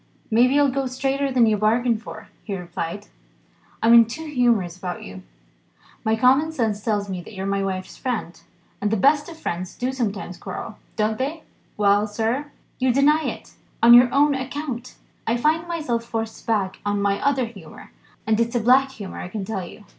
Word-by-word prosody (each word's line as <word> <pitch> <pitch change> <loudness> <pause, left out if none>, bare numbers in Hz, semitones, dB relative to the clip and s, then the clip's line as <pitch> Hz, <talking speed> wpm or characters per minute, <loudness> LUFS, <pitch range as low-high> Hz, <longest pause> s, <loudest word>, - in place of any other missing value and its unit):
"Maybe 250 +5 +4
I'll 285 -2 +4
go 270 0 -1
straighter 270 +2 -1
than 250 -3 +4
you 215 -1 +2
bargain 230 +3 +2
for," 230 - -10
he 200 -3 -4
replied; 170 -2 -5 0.8
"I'm 230 +1 +6
in 230 -1 +9
two 275 +9 -7
humours 240 - +1
about 180 -1 -6
you. 95 0 -9 0.8
My 220 0 +2
common 265 +7 +3
sense 225 -8 -1
tells 205 -2 0
me 185 -2 -4
that 175 - -13
you're 190 0 -4
my 195 0 0
wife's 185 -1 -4
friend. 215 -10 -4 0.4
And 205 - +1
the 220 - +1
best 290 - +3
of 330 - -10
friends 180 - -4
do 255 +1 -2
sometimes 205 -8 -3
quarrel, 215 - -7 0.2
don't 215 +1 0
they? 300 +5 -3 0.3
Well, 205 0 +3
sir, 225 +7 -1 0.3
you 255 0 +3
deny 295 +4 +3
it, - - -5 0.3
on 235 +1 +9
your 245 0 +8
own 285 +1 +4
account. 260 -2 -5 0.3
I 230 +2 +2
find 315 +6 +1
myself 300 -9 -2
forced 225 -1 -5
back 200 -4 0
on 205 0 0
my 200 0 +1
other 270 -3 +2
humour 195 -9 -12 0.3
and 220 0 +2
it's 235 +1 0
a - - +3
black 260 +4 +4
humour, 200 -5 -8
I - - -5
can 195 +1 -5
tell 195 -2 -3
you. 210 - -13
230 Hz, 190 wpm, -23 LUFS, 205-265 Hz, 0.8 s, in